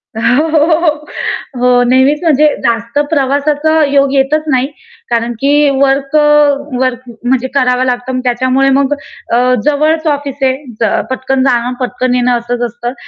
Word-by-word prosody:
हो, 250 +7 +1
हो, 310 -1 +3
हो, 325 -2 +3
हो. 300 0 -5 0.6
हो, 250 0 +3
नेहमीच 260 +4 +3
म्हणजे 305 -2 +3 0.2
जास्त 230 +2 -1
प्रवासाचा 295 +2 +1
योग 280 -1 +1
येतच 280 +3 +1
नाही. 260 +1 +1 0.4
कारण 235 0 -1
की 290 +1 +3
वर्क 275 +1 +1
अ, - - +5 0.6
वर्क 255 -2 0 0.2
म्हणजे 260 +1 0
करावा 250 -1 +2
लागतं 250 +1 -2
मग 255 - -2
त्याच्यामुळे 255 +2 +1
मग 280 +1 +1 0.4
अ, - - +4 0.3
जवळच 310 +2 +1
ऑफिस 285 -2 -2
आहे, 260 -1 +2 0.3
ज 225 -3 +1 0.2
पटकन 260 0 -1
जाणं, 245 -1 0
पटकन 250 0 -1
येणं 250 0 +1
असंच 240 +1 -4
असतं. 240 +2 -6
265 Hz, 155 wpm, -12 LUFS, 250-290 Hz, 0.6 s, अ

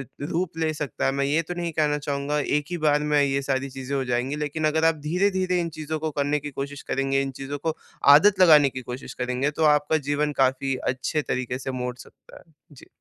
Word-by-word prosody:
इ, 135 - -7 0.2
रूप 165 +1 -3
ले 160 -1 0
सकता 150 -2 -3
है। 135 - +2
मैं 140 0 0
ये 150 +4 +1
तो 175 +2 -6
नहीं 170 -1 -3
कहना 150 -1 +1
चाहूँगा, 145 0 -2
एक 145 +1 0
ही 175 - -3
बार 150 -2 +2
में 145 - +5
ये 140 0 0
सारी 135 0 -2
चीज़ें 135 +1 -5
हो 135 - -1
जाएँगी। 125 +3 -1
लेकिन 150 +1 -3
अगर 160 +1 +1
आप 165 - +4
धीरे-धीरे 185 +1 +1
इन 170 - -2
चीज़ों 155 0 -3
को 155 0 -2
करने 145 +1 +1
की 145 +1 -6
कोशिश 140 +1 -6
करेंगे, 135 0 +1
इन 135 - -3
चीज़ों 140 +1 -4
को 160 +2 -2 0.4
आदत 190 +5 +4
लगाने 150 -6 +7
की 130 0 -7
कोशिश 125 +2 -7
करेंगे, 125 +3 -1
तो 155 +2 -1
आपका 150 +2 0
जीवन 150 0 +1
काफ़ी 135 +1 +1 0.2
अच्छे 130 +4 -2
तरीक़े 125 -1 -3
से 135 - -5
मोड़ 125 0 -3
सकता 125 - -15
है। - - -20 0.3
जी। 135 - -15
145 Hz, 230 wpm, -24 LUFS, 135-155 Hz, 0.4 s, लगाने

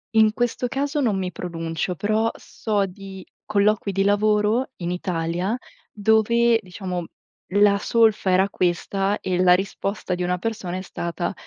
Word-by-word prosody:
in 220 -1 +5
questo 245 +1 -1
caso 285 +3 -1
non 220 -7 +1
mi 185 -1 -2
pronuncio, 165 0 -4
però 215 +5 +1
so 205 -3 -2
di 190 0 -10 0.2
colloqui 210 0 +1
di 195 0 +1
lavoro 210 +4 +2
in 175 -1 -3
Italia, 180 +3 -2 0.4
dove 225 +2 +3
diciamo 180 -2 -5 0.5
la 200 +1 +5
solfa 215 -2 +2
era 190 +2 +3
questa 195 +3 0
e 180 -1 -1
la 180 -1 +6
risposta 195 0 -2
di 180 - -3
una 180 0 0
persona 195 -3 -4
è 185 - -4
stata: 175 0 -4
200 Hz, 145 wpm, -23 LUFS, 180-215 Hz, 0.5 s, la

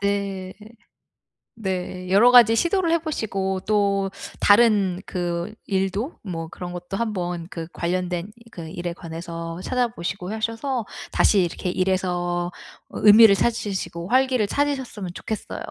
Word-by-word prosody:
네. 200 -2 -2 1.1
네. 185 -2 -4
여러 220 +6 +6
가지 235 -2 +7
시도를 340 - +1
해보시고 210 - -1
또 200 -2 +1 0.3
다른 205 -4 +4
그 175 +2 -3
일도 195 - -1
뭐 165 -5 -5
그런 175 +1 -7
것도 175 +2 -5
한번 180 -7 -2
그 165 -2 -6
관련된 180 +2 -2 0.2
그 165 -2 -8
일에 175 0 -4
관해서 165 0 -7
찾아보시고 200 -6 -2
하셔서 230 +3 -2 0.3
다시 200 -3 +4
이렇게 175 +1 -2
일에서 180 -2 0 0.4
어 - - -6
의미를 215 0 +9
찾으시고 195 -6 -2
활기를 255 -4 +3
찾으셨으면 265 -9 -2
좋겠어요. 220 +3 -5
195 Hz, 275 characters per minute, -23 LUFS, 175-220 Hz, 1.1 s, 의미를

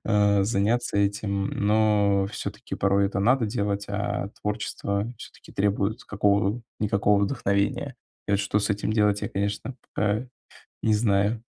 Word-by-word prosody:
А 105 -2 +3
заняться 105 +2 +1
этим, 100 -1 0
но 105 -2 +2
всё-таки - - -5
порой 100 0 +2
это 100 0 -2
надо 120 +3 +3
делать. 100 -2 -2
А 100 -1 -2
творчество 100 -1 -2
всё-таки - - -13
требует 105 +3 0
какого-никакого 100 0 +1
вдохновения. 100 -3 0 0.3
И - - +2
вот 100 - +3
что 105 0 +1
с 105 - -1
этим 100 +1 -1
делать, 105 -2 +2
я, - - -1
конечно, 100 +6 -3 0.2
пока 105 +4 0 0.6
не 110 - +3
знаю. 105 +1 +1
100 Hz, 135 wpm, -26 LUFS, 100-105 Hz, 0.6 s, А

